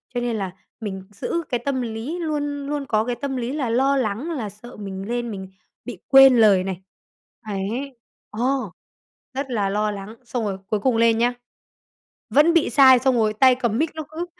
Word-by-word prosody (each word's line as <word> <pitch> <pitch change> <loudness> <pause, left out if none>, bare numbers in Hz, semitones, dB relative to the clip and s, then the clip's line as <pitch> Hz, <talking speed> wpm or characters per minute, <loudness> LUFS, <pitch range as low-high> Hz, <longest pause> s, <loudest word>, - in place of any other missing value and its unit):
cho 245 - 0
nên 240 -1 -1
là 195 -4 -3 0.3
mình 190 -3 -5
giữ 335 - -3
cái 245 - 0
tâm 275 -2 0
lý, 235 +8 -4
luôn 290 -3 -3
luôn 290 -1 -3
có 215 -4 +1
cái 245 0 -2
tâm 275 +1 -4
lý 245 0 -3
là 280 -5 -2
lo 270 +4 +2
lắng 250 +6 -2
là 245 -10 -3
sợ 215 +5 -12
mình 195 -1 -6
lên 240 0 -2
mình 190 -2 -7 0.4
bị 240 -7 -7
quên 270 -1 +8
lời 205 -5 +5
này. 190 -1 -5 0.7
Đấy, 225 +7 -4 0.3
ờ, 210 - -8 0.9
rất 270 0 -4
là 205 -4 0
lo 210 +1 0
lắng, 205 +2 -8
xong 240 -1 -3
rồi 195 -2 -2
cuối 215 -1 0
cùng 245 +2 +1
lên 230 0 +4
nhá, 240 +2 +2 1.0
vẫn 305 +4 +5
bị 335 -3 +3
sai, 260 -3 +7
xong 260 0 +2
rồi 215 -2 +2
tay 255 +4 +5
cầm 235 -4 -1
mic 315 +4 +1
nó 315 - -4
cứ, 325 +3 -4
240 Hz, 200 wpm, -22 LUFS, 210-270 Hz, 1.0 s, quên